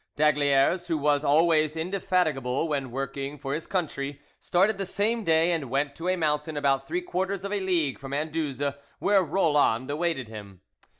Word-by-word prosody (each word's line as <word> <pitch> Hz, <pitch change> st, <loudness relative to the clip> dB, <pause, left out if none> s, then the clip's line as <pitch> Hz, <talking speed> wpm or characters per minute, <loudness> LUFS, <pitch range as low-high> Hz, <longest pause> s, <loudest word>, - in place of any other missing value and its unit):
D'Aygaliers, 150 Hz, +3 st, +3 dB
who 165 Hz, -2 st, 0 dB
was 145 Hz, 0 st, +2 dB
always 155 Hz, +1 st, +3 dB
indefatigable 160 Hz, -6 st, 0 dB
when 140 Hz, -4 st, -2 dB
working 135 Hz, +3 st, -4 dB
for 135 Hz, -1 st, -4 dB
his 155 Hz, +2 st, -4 dB
country, 145 Hz, -6 st, -3 dB, 0.2 s
started 195 Hz, +3 st, +2 dB
the 195 Hz, -, -1 dB
same 215 Hz, +4 st, 0 dB
day, 165 Hz, 0 st, +3 dB
and 155 Hz, -7 st, -1 dB
went 140 Hz, +2 st, 0 dB
to 165 Hz, -, -5 dB
a 185 Hz, -, +2 dB
mountain 155 Hz, -2 st, -1 dB
about 140 Hz, -2 st, +1 dB
three 355 Hz, +1 st, -1 dB
quarters 190 Hz, -, -2 dB
of 200 Hz, -, -3 dB
a 205 Hz, -, +1 dB
league 175 Hz, -8 st, 0 dB
from 135 Hz, -1 st, -8 dB
Anduze, 145 Hz, -2 st, -2 dB, 0.2 s
where 200 Hz, -1 st, +3 dB
Roland 145 Hz, -7 st, +2 dB
awaited 150 Hz, -5 st, -1 dB
him. 100 Hz, -4 st, -10 dB
155 Hz, 170 wpm, -27 LUFS, 140-175 Hz, 0.2 s, D'Aygaliers